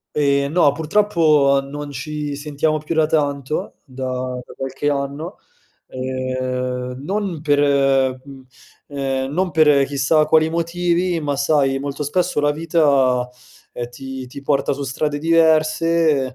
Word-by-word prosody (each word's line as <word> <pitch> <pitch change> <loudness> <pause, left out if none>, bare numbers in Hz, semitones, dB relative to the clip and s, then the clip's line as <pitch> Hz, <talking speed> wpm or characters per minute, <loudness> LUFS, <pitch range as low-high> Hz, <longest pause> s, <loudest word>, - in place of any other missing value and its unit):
Ehm, 140 -1 +1
no, 165 -3 +4
purtroppo, 155 -5 +3
non 145 +1 -7
ci 145 +1 -5
sentiamo 150 +2 -1
più 155 +2 -4
da 160 -1 +2
tanto, 145 -2 -2
da 130 -1 -4
da - - -13
qualche 135 +2 -4
anno, 140 +5 -4 0.5
ehm, 130 -1 -3
non 195 -2 -3
per 145 -2 +2
ehm, 135 -2 +2
mhmm, 135 -2 -13 0.5
ehm, 135 -1 -2
non 185 +3 0
per 150 -3 +4
chissà 145 +3 +2
quali 155 +1 +3
motivi, 170 +1 0
ma, 145 -2 -2
sai, 140 -1 +1
molto 140 +1 -4
spesso 175 +2 0
la 145 0 +2
vita, 140 -6 +2 0.4
ehm, 120 0 -6
ti 130 +1 -8
ti 140 +3 -10
porta 140 -1 +1
su 140 - -5
strade 145 +2 -2
diverse, 160 -1 +3
145 Hz, 135 wpm, -20 LUFS, 135-155 Hz, 0.5 s, no